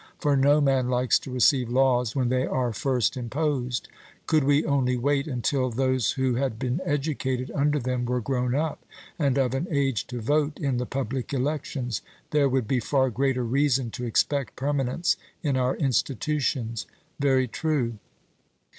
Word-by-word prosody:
For 145 Hz, -1 st, +1 dB
no 140 Hz, +2 st, +4 dB
man 135 Hz, -3 st, +2 dB
likes 125 Hz, 0 st, +2 dB
to 130 Hz, -, -9 dB
receive 125 Hz, 0 st, +3 dB
laws 125 Hz, -2 st, +2 dB
when 130 Hz, -3 st, +1 dB
they 130 Hz, +1 st, +1 dB
are 125 Hz, -3 st, -1 dB
first 125 Hz, 0 st, 0 dB
imposed: 130 Hz, 0 st, -2 dB, 0.4 s
could 155 Hz, -2 st, +3 dB
we 145 Hz, +2 st, +3 dB
only 130 Hz, -4 st, +1 dB
wait 140 Hz, +3 st, +1 dB
until 130 Hz, 0 st, 0 dB
those 130 Hz, -1 st, +1 dB
who 130 Hz, -2 st, 0 dB
had 125 Hz, -2 st, -1 dB
been 130 Hz, +6 st, -2 dB
educated 135 Hz, -5 st, -2 dB
under 145 Hz, +1 st, +2 dB
them 125 Hz, -2 st, -1 dB
were 125 Hz, +1 st, 0 dB
grown 125 Hz, 0 st, -1 dB
up, 155 Hz, +1 st, -2 dB, 0.4 s
and 140 Hz, -3 st, +2 dB
of 130 Hz, -2 st, +1 dB
an 135 Hz, +7 st, -1 dB
age 135 Hz, -, 0 dB
to 125 Hz, -1 st, -5 dB
vote 145 Hz, +5 st, 0 dB
in 135 Hz, -4 st, 0 dB
the 125 Hz, 0 st, -2 dB
public 135 Hz, 0 st, -3 dB
elections, 135 Hz, -3 st, -2 dB, 0.3 s
there 145 Hz, -2 st, +3 dB
would 130 Hz, -4 st, 0 dB
be 130 Hz, +1 st, +1 dB
far 130 Hz, +2 st, +1 dB
greater 130 Hz, +2 st, 0 dB
reason 130 Hz, 0 st, +1 dB
to 125 Hz, -, -5 dB
expect 135 Hz, +4 st, 0 dB
permanence 140 Hz, +3 st, 0 dB, 0.3 s
in 145 Hz, -4 st, +1 dB
our 130 Hz, 0 st, +1 dB
institutions. 130 Hz, -, -1 dB, 0.3 s
'Very 135 Hz, -2 st, +3 dB
true.' 125 Hz, -5 st, -1 dB
130 Hz, 165 wpm, -26 LUFS, 125-140 Hz, 0.4 s, no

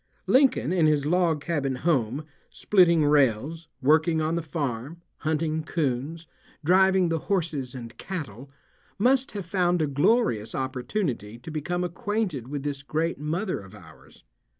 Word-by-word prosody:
Lincoln 255 Hz, -2 st, +3 dB
in 170 Hz, -4 st, +4 dB
his 150 Hz, -2 st, +2 dB
log 165 Hz, -2 st, +2 dB
cabin 145 Hz, -5 st, -1 dB
home, 135 Hz, -1 st, 0 dB, 0.2 s
splitting 170 Hz, -6 st, +3 dB
rails, 145 Hz, +3 st, +2 dB, 0.2 s
working 160 Hz, +3 st, +4 dB
on 155 Hz, +1 st, 0 dB
the 170 Hz, -, 0 dB
farm, 145 Hz, -1 st, -4 dB, 0.2 s
hunting 155 Hz, 0 st, -1 dB
coons, 155 Hz, +1 st, -2 dB, 0.4 s
driving 190 Hz, +1 st, +4 dB
the 165 Hz, -1 st, 0 dB
horses 155 Hz, -10 st, -1 dB
and 120 Hz, -2 st, -8 dB
cattle, 140 Hz, -, -6 dB, 0.5 s
must 260 Hz, +5 st, +2 dB
have 200 Hz, -3 st, -5 dB
found 180 Hz, -1 st, +1 dB
a 155 Hz, -, +2 dB
glorious 140 Hz, -, +1 dB
opportunity 130 Hz, -, -3 dB
to 125 Hz, +7 st, -9 dB
become 175 Hz, +4 st, -2 dB
acquainted 180 Hz, -, -2 dB
with 145 Hz, 0 st, -4 dB
this 145 Hz, -2 st, -3 dB
great 155 Hz, +3 st, -2 dB
mother 170 Hz, +7 st, -2 dB
of 95 Hz, +1 st, -13 dB
ours. 80 Hz, -6 st, -16 dB
155 Hz, 140 wpm, -26 LUFS, 135-175 Hz, 0.5 s, in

